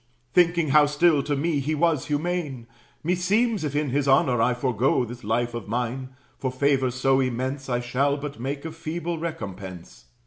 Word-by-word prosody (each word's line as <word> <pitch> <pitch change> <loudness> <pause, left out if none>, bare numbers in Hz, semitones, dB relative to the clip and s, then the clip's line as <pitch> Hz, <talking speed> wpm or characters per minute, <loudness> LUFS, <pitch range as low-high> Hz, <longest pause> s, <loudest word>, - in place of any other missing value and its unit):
Thinking 170 -3 +3
how 150 +1 +6
still 150 0 +3
to 145 +1 -1
me 150 +1 0
he 150 +3 -1
was 160 -3 +1
humane, 150 -5 -2 0.4
Meseems, 195 +5 +1
if 145 -2 -3
in 145 -3 0
his 140 +1 0
honor 130 -3 +4
I 120 +1 +3
forego 125 0 +1
This 120 +1 -9
life 120 +3 0
of 115 -4 -6
mine, 125 +3 -3 0.2
for 130 - -1
favors 130 -1 +1
so 135 +1 +3
immense 130 +2 -2
I 120 -1 0
shall 135 +4 +1
but 140 -3 -6
make 140 +4 -4
a 160 - -4
feeble 165 +1 -4
recompense. 95 - -7
140 Hz, 175 wpm, -25 LUFS, 125-155 Hz, 0.4 s, how